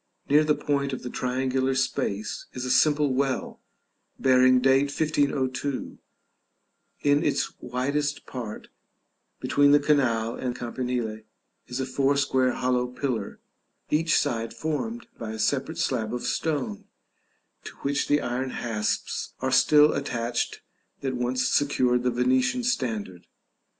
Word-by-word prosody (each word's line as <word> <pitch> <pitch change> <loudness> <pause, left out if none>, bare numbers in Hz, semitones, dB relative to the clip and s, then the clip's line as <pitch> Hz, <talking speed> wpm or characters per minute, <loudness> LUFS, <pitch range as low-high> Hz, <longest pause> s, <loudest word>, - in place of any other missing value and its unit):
Near 150 +2 +5
the 150 -1 +2
point 140 -1 -1
of 130 - -5
the 125 - -5
triangular 130 +1 0
space 115 -5 -2
is 125 0 -4
a 125 - -1
simple 145 +1 +3
well, 135 0 -1 0.6
bearing 130 -1 +5
date 135 +2 +4
1502; 140 -2 -1 1.0
in 145 0 +3
its 145 - 0
widest 140 +4 -2
part, 115 -5 -7 0.7
between 145 0 +4
the 145 - +7
canal 125 -6 +1
and 125 -1 -3
campanile, 120 -3 -3 0.5
is 125 +1 -4
a 130 - -1
four 135 +2 +1
square 130 -2 +2
hollow 125 -1 0
pillar, 125 -4 -4 0.5
each 160 +2 +3
side 115 -1 -1
formed 225 +10 -3
by 110 -1 -5
a - - -6
separate 135 +7 -1
slab 115 -3 -1
of 125 - -5
stone, 145 -10 -2 0.8
to - - -8
which 140 0 0
the 145 0 +3
iron 125 +2 -2
hasps 110 -4 -3
are - - -1
still 150 0 +6
attached 120 -4 -2 0.4
that 135 -1 -2
once 125 +1 0
secured 125 -4 +2
the 125 - +1
Venetian 125 - +1
standard. 110 - -2
130 Hz, 130 wpm, -26 LUFS, 125-145 Hz, 1.0 s, the